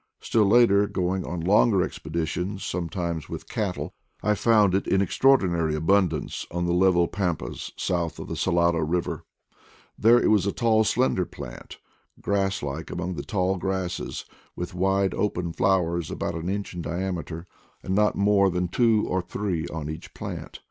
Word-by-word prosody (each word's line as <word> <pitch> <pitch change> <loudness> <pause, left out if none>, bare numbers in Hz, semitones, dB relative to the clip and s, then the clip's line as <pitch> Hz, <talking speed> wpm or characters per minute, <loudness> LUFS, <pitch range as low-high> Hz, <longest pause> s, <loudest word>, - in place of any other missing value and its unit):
Still 110 -2 +2
later, 105 -2 +5
going 95 0 -1
on 90 -1 -4
longer 100 +2 +4
expeditions, 85 +3 -3
sometimes 85 -2 -3
with - - -7
cattle, - - -3 0.3
I 105 - +3
found 105 -2 +3
it 95 - 0
in 95 - +3
extraordinary 90 - +3
abundance 85 0 +1
on 85 0 -2
the 85 - +1
level 90 -1 +4
pampas 85 -10 -3
south 85 -3 -1
of - - -7
the - - -4
Salado 85 -2 +2
Eiver; 85 +3 -1 0.8
there 115 +3 +6
it - - +2
was 100 -3 +3
a - - +1
tall 110 -1 +3
slender 115 -4 +1
plant, - - -9 0.4
grass 95 -2 0
like 75 +3 -4
among 90 +2 -3
the - - -4
tall 95 -2 0
grasses, 95 -1 -3 0.3
with 90 0 -5
wide 95 +1 +1
open 90 -5 -1
flowers 85 -3 +1
about - - -3
an 85 +2 -4
inch 100 0 -3
in 90 - -5
diameter, 85 -1 -4 0.4
and 95 - -2
not 105 +1 +3
more 100 -1 +4
than 90 0 -1
two 115 +1 +3
or 95 0 0
three 90 -3 -3
on 80 -3 -5
each 80 +1 -8
plant. - - -7
90 Hz, 160 wpm, -25 LUFS, 85-100 Hz, 0.8 s, there